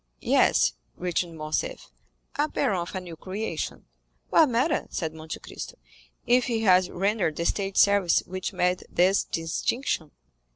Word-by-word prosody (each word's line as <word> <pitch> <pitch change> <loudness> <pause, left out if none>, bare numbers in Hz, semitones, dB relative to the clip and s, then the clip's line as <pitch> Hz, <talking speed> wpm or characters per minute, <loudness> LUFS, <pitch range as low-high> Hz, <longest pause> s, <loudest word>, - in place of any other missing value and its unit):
"Yes," - - +4 0.2
returned 175 -2 -2
Morcerf, 155 0 -3 0.4
"a 295 +1 +1
baron 195 -10 0
of 175 +3 -5
a - - -1
new 175 -2 -9
creation." 195 +6 -4 0.5
"What 315 -4 +6
matter," 255 +6 +1
said 160 -2 -3
Monte 160 0 -7
Cristo - - -8 0.5
"if 245 0 +4
he 230 -3 -1
has 185 -3 +4
rendered 195 -3 0
the 170 - -2
State 195 +1 -1
services 200 -4 +4
which 185 0 -4
merit 180 0 +1
this 185 +3 +3
distinction?" 165 - -2
185 Hz, 140 wpm, -26 LUFS, 170-215 Hz, 0.5 s, What